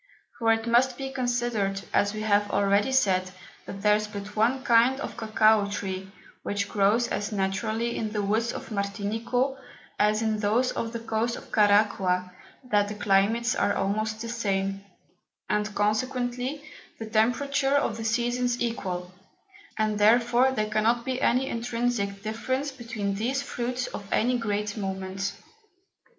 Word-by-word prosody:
For 225 -1 +3
it 225 0 +1
must 245 +2 +3
be 270 -1 -5
considered, 240 -6 -1
as 205 - +3
we 215 0 -5
have 205 -1 +2
already 200 +4 +2
said, 185 -8 +2 0.4
that 195 0 -7
there 210 0 +5
is 215 0 -4
but 205 -1 -8
one 240 +5 +2
kind 245 +1 +4
of - - -5
Cocao 215 -2 +3
Tree, 190 -1 -4 0.3
which 200 0 -2
grows 215 +4 +2
as 205 - -2
naturally 215 +4 -1
in 215 -1 -3
the 210 -1 -1
Woods 220 +4 +1
of - - -7
Martinico, 225 +6 -1 0.4
as 215 +1 +3
in 220 -1 0
those 225 +5 +2
of 230 - -3
the 230 - -4
Coast 230 +1 -1
of - - -11
Caraqua, 200 -3 +3 0.3
that 205 -5 +2
the 210 - -5
Climates 210 +5 +2
are 205 - +1
almost 215 +2 -1
the 230 - -4
same, 195 -4 -1 0.6
and 210 +1 -1
consequently 245 +6 -1 0.3
the 225 - -6
Temperature 270 +6 +1
of 255 -6 +1
the 225 - -5
Seasons 240 +2 0
equal, 185 -6 -3 0.6
and 215 -1 0
therefore 240 +4 +4
there 215 -4 -2
cannot 230 +3 +2
be 260 0 -2
any 260 +1 +2
intrinsick 230 -4 -2
Difference 260 +6 -2
between 230 -6 -4
these 250 +7 -1
Fruits 245 -1 -3
of 200 0 -8
any 250 +3 +2
great 210 -2 -2
moment. 195 -1 -3
220 Hz, 150 wpm, -27 LUFS, 205-240 Hz, 0.6 s, there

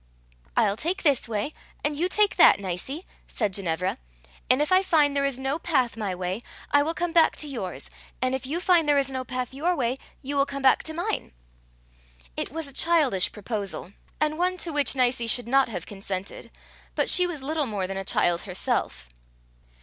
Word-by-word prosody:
"I'll 200 - +3
take 345 - -2
this 280 -7 +2
way, 220 +7 -2 0.3
and 295 0 0
you 345 +5 0
take 420 +1 +3
that, - - +7
Nicie," 200 - -4 0.2
said 210 -5 -1
Ginevra, 180 - -1 0.5
"and 255 - +5
if 295 +3 0
I 370 0 +6
find 300 -6 +3
there 280 0 +2
is 275 -3 -1
no 270 +4 -2
path 265 -9 +1
my 205 -5 -3
way, 185 +4 -3 0.3
I 285 - +5
will 320 +3 -1
come 350 -1 -2
back 330 -2 +5
to 300 - -5
yours; 230 -10 -5 0.3
and 255 +1 0
if 265 -1 -3
you 320 +5 -2
find 350 -4 +3
there 290 - +5
is 275 -1 +1
no 260 -1 -3
path 255 0 -4
your 335 +6 0
way, 255 -2 -1 0.2
you 280 +2 -3
will 275 0 +3
come 275 -1 -5
back 260 - +5
to 315 - -4
mine." 345 - -3 1.0
It - - -3
was 325 +1 -4
a 275 - -10
childish 285 - +2
proposal, 200 -4 -4 0.3
and 305 +1 0
one 365 +1 +1
to 335 -3 -2
which 290 -1 +1
Nicie 245 -2 +2
should 235 0 +1
not 270 +1 +3
have 180 -6 -5
consented, 195 -1 -6 0.5
but - - +1
she 360 -1 +5
was 310 -6 -6
little 300 0 -1
more 205 -4 -2
than 195 +1 -4
a 195 - -3
child 175 -2 +2
herself. 65 - -2
270 Hz, 200 wpm, -26 LUFS, 210-310 Hz, 1.0 s, that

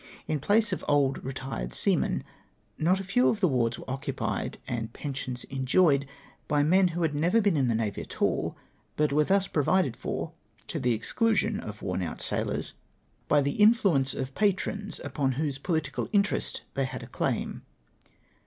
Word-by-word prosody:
In 155 - 0
place 205 +6 +2
of - - -4
old 140 -2 +2
retired 130 - -4
seamen, - - +1 0.6
not 180 +4 +3
a - - -4
few 200 +7 +3
of 215 - 0
the 190 - +4
wards 120 -5 +1
were - - -11
occupied, 135 +2 -3
and 115 -2 -3
pensions 130 -2 -4
enjoyed, 140 +2 +2 0.4
l)y 145 -1 +3
men 185 +5 +5
who 175 0 -2
had 160 -2 +1
never 170 +9 +3
been 200 -5 +2
in 135 -4 +2
the 115 - +1
navy 110 -2 -1
at - - -10
all, - - +1 0.4
but 150 -1 +2
were 150 +1 +4
tlius 195 +2 +1
provided 150 -3 +2
for, - - -4 0.3
to - - -4
the 125 -1 +2
exclusion 215 - +1
of 105 -1 -8
worn 90 0 -1
out 85 -3 -4
sailors, - - -2 0.5
by 145 - +4
the 140 +8 -1
in 215 +3 +8
fluence 155 - +1
of 130 0 -4
patrons 205 +1 0
upon 140 -1 0
whose 140 0 -2
political 160 -1 -2
interest 205 -1 +1
they 135 -1 0
had 130 - -6
a - - -9
claim. - - -2
145 Hz, 175 wpm, -28 LUFS, 130-190 Hz, 0.6 s, in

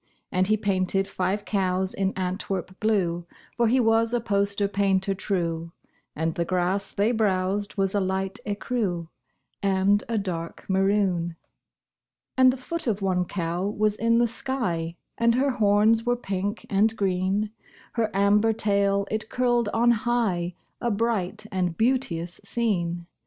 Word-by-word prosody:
And 185 +1 +2
he 215 +1 +3
painted 195 -1 0
five 195 +1 -2
cows 190 -2 0
in 195 -1 0
Antwerp 185 0 -3
blue 175 -6 0 0.3
(For 235 -1 +3
he 255 +4 +3
was 225 0 +3
a - - +2
poster 200 -2 0
painter 195 -1 +1
true), 170 -4 -2 0.4
And 160 +1 -1
the 170 - -1
grass 185 +3 -1
they 205 +4 +1
browsed 205 -2 0
was 195 -1 +1
a 205 - +2
light 190 0 -2
écru 200 -5 -2 0.5
And 195 +1 +2
a 230 - 0
dark 170 -5 -4
maroon. 190 -3 +1 1.0
And 260 -1 +6
the 260 - -5
foot 330 +4 -5
of 205 -3 0
one 180 -2 +1
cow 175 +1 -2
was 210 0 +1
in 230 +1 +2
the 240 0 +4
sky, 200 -10 -2 0.2
And 235 0 +4
her 270 +2 +2
horns 220 -1 +3
were 245 0 +2
pink 200 -3 -3
and 215 +2 +2
green; 195 +2 0 0.4
Her 225 -2 0
amber 205 +3 +3
tail 200 -2 +1
it 220 0 -3
curled 240 -3 +1
on 235 +2 +3
high 215 -7 0 0.3
A 240 - +1
bright 215 -3 -1
and 180 -3 -1
beauteous 205 -9 0
scene. 175 -6 -1
200 Hz, 145 wpm, -25 LUFS, 185-225 Hz, 1.0 s, And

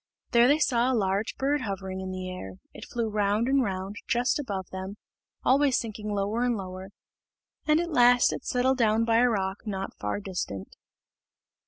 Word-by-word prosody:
There 235 0 +6
they 290 +3 +5
saw 250 -4 +2
a 250 - +1
large 195 +1 0
bird 285 +1 +1
hovering 190 -4 -4
in 190 - -5
the 185 0 -5
air; 180 - -7 0.2
it - - -9
flew 235 -2 -2
round 210 +2 +1
and 275 +1 +3
round 195 -2 -3
just 245 +5 +1
above 195 -9 -4
them, 190 +2 -6 0.5
always 270 0 +4
sinking 215 -2 -4
lower 205 +3 -1
and 245 -2 +1
lower, 185 0 -7 0.8
and 305 +1 +4
at 345 0 -2
last 245 -1 +5
it - - -6
settled 260 +1 +1
down 225 0 +3
by 230 0 +3
a 245 +1 +5
rock 195 -1 -2
not 195 -2 -4
far 105 - -2
distant. 180 - -5
215 Hz, 180 wpm, -27 LUFS, 190-245 Hz, 0.8 s, There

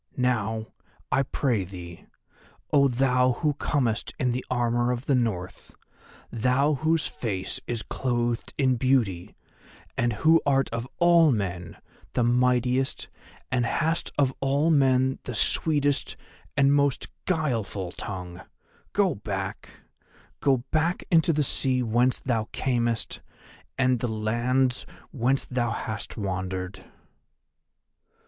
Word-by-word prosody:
Now, 115 -3 0 0.5
I - - +3
pray 125 -6 0
thee, 90 -2 -10 0.7
oh 140 -1 +6
thou 125 0 +2
who 150 +4 0
comest 125 -6 -1
in 125 -1 +1
the 125 +1 -2
armour 120 0 +1
of 125 +2 -3
the 140 - +2
North, 110 -8 -2 0.6
thou 130 +6 +2
whose 155 +2 +1
face 100 -10 -2
is 120 -2 -2
clothed 120 -2 -2
in 130 -3 +2
beauty, 115 -9 +1 0.6
and 120 0 +1
who 160 +8 +4
art 135 -1 +2
of 115 +1 -3
all 170 -3 +5
men 90 -6 -3 0.4
the 125 - +1
mightiest 125 +2 +1 0.4
and 125 -2 +2
hast 160 +7 0
of 135 -2 +2
all 140 +4 +2
men 130 -2 +3
the 125 - -4
sweetest 145 +2 +1 0.4
and 140 0 +5
most 140 -2 +1 0.2
guileful 115 - -1
tongue, 90 -3 -7 0.5
go 200 -3 +3
back, 100 -2 -5 0.7
go 135 -4 +2
back 160 +3 +1
into 165 -1 +5
the 150 -1 +1
sea 130 -2 +1
whence 120 +3 +2
thou 115 -4 -1
camest, 120 -3 -1 0.6
and 130 -2 +2
the 120 - -1
lands 120 +4 0 0.3
whence 135 0 0
thou 120 -2 -1
hast 110 -1 -5
wandered." 95 -2 -4
125 Hz, 120 wpm, -26 LUFS, 110-135 Hz, 0.7 s, oh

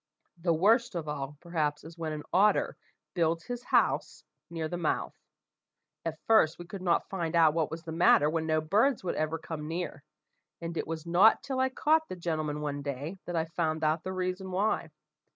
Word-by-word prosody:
The 170 0 +2
worst 205 +7 +3
of 165 -3 -3
all, 145 -1 -4
perhaps, 155 -4 -1
is 160 +1 -11
when 165 -2 -4
an 150 -1 -5
otter 200 +2 +3 0.4
builds 165 -1 +1
his 245 -1 -5
house - - +1 0.3
near 165 -2 -3
the 175 - -4
mouth. 170 -3 -1 0.9
At 165 -1 -3
first 220 -8 +4
we 175 - -9
could 190 +2 -8
not 175 -2 +1
find 170 -3 -2
out 160 -2 +6
what 160 -2 0
was 160 0 -7
the 160 - -6
matter 160 -3 +5
when 160 +1 -1
no 155 0 +2
birds 215 - +2
would 180 - -1
ever 155 +1 -1
come 155 -2 -6
near, 165 -1 -4 0.6
and 170 0 -5
it - - -2
was 160 0 -5
not 180 +6 +5
till 265 -1 -3
I 260 0 +3
caught 315 +4 +2
the - - -4
gentleman 155 -4 -2
one 145 -1 -3
day, 145 +6 -5
that 175 - -3
I 160 -1 +1
found 160 -1 -2
out 155 +1 +2
the 185 - -4
reason 185 0 -3
why. 195 +4 0
165 Hz, 200 wpm, -30 LUFS, 155-185 Hz, 0.9 s, out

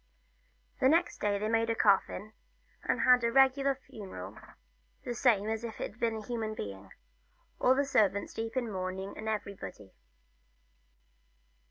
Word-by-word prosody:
Next 325 +7 +3
day 205 -1 +1
they 210 +2 -2
made 225 +1 +1
a 230 - +1
coffin, 205 0 +2 0.5
and - - +1
had 250 -1 +6
a 235 - +2
regular 270 +1 +4
funeral, 110 - -8 0.7
the 245 - -3
same 230 -4 +3
as 220 +1 -2
if 230 -2 -6
it 220 - -6
were 235 - +3
a 215 - -8
human 225 -3 -3
being; 100 - -7 0.7
all 255 - +4
the 280 +1 +2
servants 205 -7 +1
in 225 - -2
deep 225 - -20
mourning, 190 -2 -4
and 220 0 -4
everybody. 200 - -5
220 Hz, 145 wpm, -31 LUFS, 200-245 Hz, 0.7 s, had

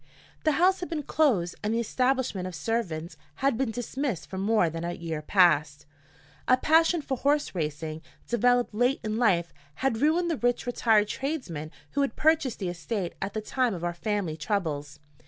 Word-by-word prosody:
The 310 - +4
house 370 +5 +3
had 355 - -5
been 315 -3 -3
closed 225 - +2
and 215 +2 -1
the - - +1
establishment 250 -5 0
of 185 - -7
servants 170 -2 -3 0.2
had 275 -2 +1
been 260 0 0
dismissed 245 - -3
for 190 - -5
more 210 -2 +3
than 165 +1 -4
a 175 0 -2
year 165 -3 -4
past. 150 -4 +3 0.6
A 255 - +5
passion 325 +3 +3
for 265 - -2
horse 290 +3 +1
racing, 155 -1 -3 0.3
developed 245 0 +2
late 245 +5 +2
in 215 0 -2
life, 180 -8 +2 0.2
had 260 -4 -1
ruined 335 +3 +2
the 320 - -1
rich 245 0 0
retired 225 -3 +3
tradesman 210 - -4 0.2
who 285 - 0
had 275 - 0
purchased 310 -6 +2
the 185 - -3
estate 180 +2 -3
at 195 +2 -3
the 215 - -1
time 245 0 0
of 170 - -7
our 175 0 -1
family 200 -3 -2
troubles. 155 -5 -3
220 Hz, 180 wpm, -27 LUFS, 170-265 Hz, 0.6 s, A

